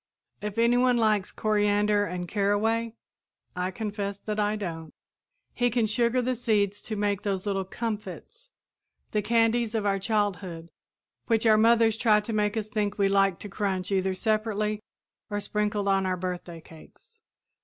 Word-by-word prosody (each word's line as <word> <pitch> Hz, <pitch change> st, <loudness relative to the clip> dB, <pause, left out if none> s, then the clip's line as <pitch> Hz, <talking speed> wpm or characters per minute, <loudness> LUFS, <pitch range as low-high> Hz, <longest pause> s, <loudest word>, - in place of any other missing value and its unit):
If 210 Hz, +1 st, -5 dB
anyone 245 Hz, +2 st, +4 dB
likes 215 Hz, -4 st, +2 dB
coriander 205 Hz, -1 st, +2 dB
and 180 Hz, -2 st, -4 dB
caraway 220 Hz, +4 st, 0 dB, 0.6 s
I 180 Hz, 0 st, -1 dB
confess 200 Hz, -1 st, -4 dB
that 210 Hz, +1 st, -4 dB
I 210 Hz, 0 st, +1 dB
don't 165 Hz, -6 st, -6 dB, 0.6 s
he 245 Hz, 0 st, +1 dB
can 235 Hz, -1 st, +1 dB
sugar 235 Hz, +3 st, +1 dB
the 255 Hz, +1 st, 0 dB
seeds 210 Hz, -4 st, 0 dB
to 215 Hz, -, -2 dB
make 205 Hz, -1 st, 0 dB
those 195 Hz, -2 st, -2 dB
little 195 Hz, -2 st, -1 dB
"comfits," 230 Hz, -, -6 dB, 0.6 s
the 210 Hz, -, +1 dB
candies 230 Hz, +1 st, +2 dB
of 215 Hz, -2 st, 0 dB
our 195 Hz, -1 st, +1 dB
childhood 190 Hz, -5 st, -2 dB, 0.6 s
which 225 Hz, -1 st, +2 dB
our 220 Hz, -1 st, +6 dB
mothers 225 Hz, 0 st, +4 dB
tried 210 Hz, -3 st, +3 dB
to 225 Hz, -, -3 dB
make 210 Hz, +1 st, 0 dB
us 215 Hz, -1 st, -2 dB
think 210 Hz, -1 st, -2 dB
we 200 Hz, -1 st, +3 dB
liked 195 Hz, -2 st, +2 dB
to 205 Hz, -, -7 dB
crunch 195 Hz, -2 st, -2 dB
either 190 Hz, -1 st, +1 dB
separately 215 Hz, 0 st, -1 dB, 0.5 s
or 205 Hz, -1 st, -2 dB
sprinkled 210 Hz, 0 st, -1 dB
on 195 Hz, -1 st, +2 dB
our 185 Hz, 0 st, -1 dB
birthday 180 Hz, -2 st, -5 dB
cakes. 165 Hz, -, -17 dB
210 Hz, 155 wpm, -27 LUFS, 195-225 Hz, 0.6 s, our